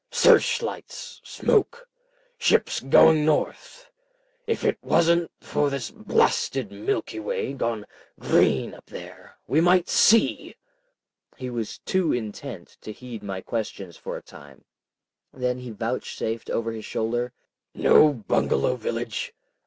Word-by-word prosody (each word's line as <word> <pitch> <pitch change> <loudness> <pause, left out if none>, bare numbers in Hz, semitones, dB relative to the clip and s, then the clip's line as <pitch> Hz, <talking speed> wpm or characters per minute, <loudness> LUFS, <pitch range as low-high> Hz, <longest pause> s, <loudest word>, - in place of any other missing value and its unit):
"Search 470 - +4
lights! - - -7
Smoke! 475 +3 0 0.5
Ships 480 - +2
going 155 -1 +5
north! - - -2 0.6
If 455 - -1
it - - +1
wasn't 170 0 +2
for 145 - 0
this 135 -5 -4
blasted 130 -6 0
Milky 110 +2 -3
Way 110 +5 -3
gone 115 -5 -2 0.3
green - - +2
up - - -15
there, - - -11
we 155 - +2
might 175 +1 +4
see." 225 +1 +3 0.8
He 130 -1 -5
was 115 -3 -4
too 185 -4 +1
intent 110 -3 -6
to 110 - -7
heed 120 0 -9
my 95 -2 -5
questions 100 -6 -5
for - - -6
a - - -11
time. 70 -2 -15 0.7
Then 125 -1 -2
he 125 -1 -8
vouchsafed 115 0 -4
over 115 0 -1
his 110 -1 -7
shoulder— 120 +2 -2 0.4
"Know 150 - +6
Bungalow 105 - 0
village? - - -4
125 Hz, 125 wpm, -25 LUFS, 110-160 Hz, 0.8 s, Know